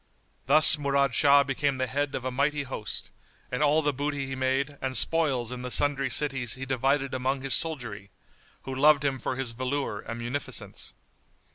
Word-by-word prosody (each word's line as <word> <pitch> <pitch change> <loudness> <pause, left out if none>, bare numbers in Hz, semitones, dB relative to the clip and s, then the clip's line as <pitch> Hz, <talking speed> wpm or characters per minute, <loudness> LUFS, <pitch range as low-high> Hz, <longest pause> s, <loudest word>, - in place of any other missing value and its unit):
Thus 155 +2 +7
Murad 140 -2 +1
Shah 140 +2 +5
became 140 +1 -1
the 130 - -1
head 140 +3 -2
of 130 - -5
a 130 - -2
mighty 140 +3 0
host, 130 -5 -5 0.4
and 125 - -2
all 150 +1 +3
the 145 0 +1
booty 145 0 -3
he 135 0 -5
made 135 +2 -1
and 130 -1 0
spoils 135 -8 +1
in 125 -1 -6
the 125 - -5
sundry 135 0 +2
cities 130 -3 0
he 130 +1 -6
divided 135 +1 0
among 130 +1 -2
his 135 -1 +1
soldiery, 120 -11 -2 0.5
who 135 - -6
loved 145 +2 +4
him 135 -2 -1
for 130 - -3
his 130 -2 -3
valour 130 -2 -3
and 115 +2 -7
munificence. 125 +4 -4
135 Hz, 180 wpm, -27 LUFS, 130-145 Hz, 0.5 s, Thus